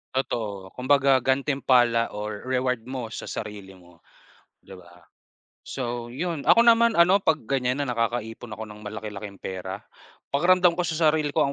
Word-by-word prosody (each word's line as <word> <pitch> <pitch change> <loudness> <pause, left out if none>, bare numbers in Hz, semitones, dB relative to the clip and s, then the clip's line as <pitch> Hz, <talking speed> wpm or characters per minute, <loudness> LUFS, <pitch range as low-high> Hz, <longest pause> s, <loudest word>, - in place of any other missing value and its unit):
Totoo. 105 -7 -3
Kumbaga 135 +1 +3
gantimpala, 130 -3 +2
or 105 0 -5
reward 125 -1 0
mo 125 -4 -5
sa - - -7
sarili 100 -3 -7
mo, 90 -2 -20 0.6
di - - -17
ba? 90 -2 -14 0.6
So 120 -2 -4
yun, 155 +4 -4
ako 235 - +6
naman 235 0 +5
ano, 180 +3 +5
'pag 160 -5 0
ganyan 130 +1 0
na 140 - -2
nakakaipon 115 -1 -3
ako 110 - -8
ng 105 0 -11
malaki-laking 105 -1 -7
pera, 95 +1 -6 0.5
pakiramdam 180 +4 +4
ko - - +2
sa 160 -1 +2
sarili 150 -1 -1
ko 150 -3 +2
125 Hz, 150 wpm, -25 LUFS, 105-145 Hz, 0.6 s, ako